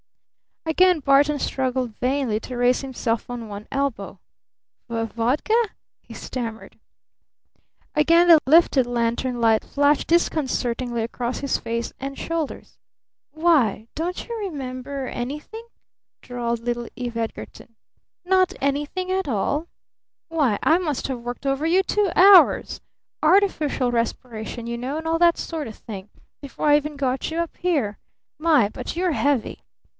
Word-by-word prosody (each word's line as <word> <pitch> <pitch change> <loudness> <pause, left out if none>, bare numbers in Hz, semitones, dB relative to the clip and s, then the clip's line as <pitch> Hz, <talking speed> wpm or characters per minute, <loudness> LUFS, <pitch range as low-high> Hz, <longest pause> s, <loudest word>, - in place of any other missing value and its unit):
Again 360 +2 +4
Barton 285 +2 +4
struggled 255 -4 -2
vainly 250 -4 0
to 250 - -7
raise 245 +1 +3
himself 245 -4 -3
on 240 -2 -6
one 205 0 -8
elbow. 230 -9 -3 0.7
"Vodka?" 230 - -1 0.5
he - - -13
stammered. 230 -3 -6 1.1
Again 335 +3 +4
the 330 -2 +9
lifted 290 -4 +5
lantern 240 +1 -1
light 225 -2 +3
flashed 285 +1 +1
disconcertingly 250 -8 0
across 240 +2 -3
his 280 -1 0
face 230 0 -4
and 275 +1 -6
shoulders. 330 -3 -4 0.5
"Why, 285 - +2
don't 345 +3 -4
you 470 - -4
remember 275 -7 -5
anything?" 300 - -6 0.5
drawled 235 -2 -3
little 240 0 -3
Eve 240 -2 -5
Edgarton. 230 0 -6 0.5
"Not 370 0 +3
anything 290 +7 -1
at 380 -3 -1
all? 280 - -1 0.6
Why, 290 -10 +1
I 320 - +5
must 305 -7 -2
have 260 -2 -3
worked 245 +3 -7
over 275 +2 0
you 365 +3 +3
two 410 -2 +1
hours 385 0 +6 0.4
artificial 310 -7 +2
respiration, 230 0 -3
you 235 0 -4
know, 260 +5 -4
and 320 0 -5
all 330 0 +1
that 340 -1 +5
sort 320 -3 -4
of 220 - -9
thing 200 -2 -9 0.3
before 280 +1 -4
I 295 0 +7
even 300 0 -4
got 265 -2 -1
you 320 - -4
up 335 -1 -3
here! 285 - -1 0.4
My! 305 -10 +4
But - - -6
you're 360 +1 +1
heavy!" 285 -5 0
270 Hz, 135 wpm, -23 LUFS, 235-320 Hz, 1.1 s, the